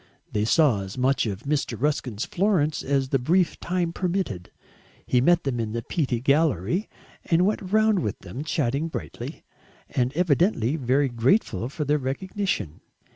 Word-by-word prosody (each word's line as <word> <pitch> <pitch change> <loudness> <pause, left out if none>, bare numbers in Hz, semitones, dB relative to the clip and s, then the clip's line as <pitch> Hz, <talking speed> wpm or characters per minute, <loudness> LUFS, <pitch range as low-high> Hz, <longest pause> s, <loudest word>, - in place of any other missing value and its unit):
They 105 0 0
saw 130 -5 +3
as 95 +3 -7
much 130 -1 +2
of 100 +2 -5
Mr. 140 -5 -1
Ruskin's 130 -5 -1
Florence 175 -6 +1
as 135 -1 0
the 135 - +2
brief 175 +8 +1
time 175 -1 -1
permitted; 175 - -2 0.6
he 125 - +2
met 175 +5 +4
them 130 -4 -2
in 110 -1 -2
the 115 0 -3
Pitti 130 -6 -1
Gallery 140 - +1 0.4
and 170 +2 +3
went 210 - 0
round 215 -1 +4
with 105 - -2
them, 110 +10 -7
chatting 150 -1 0
brightly, 80 - -7 0.5
and 125 0 +1
evidently 155 - +2
very 135 0 +2
grateful 120 - +1
for 150 +2 -4
their 150 +1 +2
recognition. 140 - -3
140 Hz, 155 wpm, -25 LUFS, 120-170 Hz, 0.6 s, met